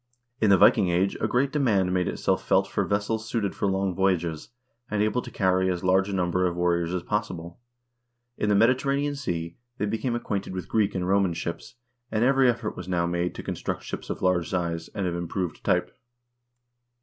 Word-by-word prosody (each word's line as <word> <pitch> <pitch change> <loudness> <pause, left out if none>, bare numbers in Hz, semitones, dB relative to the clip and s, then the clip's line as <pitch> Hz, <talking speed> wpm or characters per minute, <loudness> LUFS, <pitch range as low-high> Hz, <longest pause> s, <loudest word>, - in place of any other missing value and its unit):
In 110 - +3
the 100 - +7
Viking 90 - +5
Age 90 +3 +1
a - - +2
great 135 +3 +1
demand 105 -11 +2
made 90 -1 +1
itself - - 0
felt - - +3
for - - -1
vessels 110 +2 -1
suited 105 -5 -1
for - - -1
long 95 -1 0
voyages, 85 -4 0 0.4
and 105 0 +1
able 110 +4 +1
to - - -9
carry 95 -2 +1
as 90 -1 -2
large 95 +1 +3
a - - -3
number 90 0 +1
of 85 - -3
warriors 85 -1 +1
as 90 -1 -2
possible. 90 -5 -3 0.8
In 105 - -1
the 105 - +4
Mediterranean 135 +6 +2
Sea 85 -11 -4 0.2
they - - -1
became 115 +3 -1
acquainted 100 -5 -3
with 90 - -5
Greek 105 -2 +1
and 90 -1 -1
Roman 95 -2 +2
ships, 85 +6 -5 0.4
and 110 +1 +1
every 135 0 +4
effort 115 -2 -2
was 90 - -8
now 90 -2 +1
made 85 +1 -1
to - - -7
construct - - -4
ships - - -6
of - - -4
large 90 -3 +2
size, 85 -2 -2
and 100 -2 -1
of 90 - -1
improved 85 +1 -3
type. - - 0
95 Hz, 195 wpm, -26 LUFS, 90-110 Hz, 0.8 s, the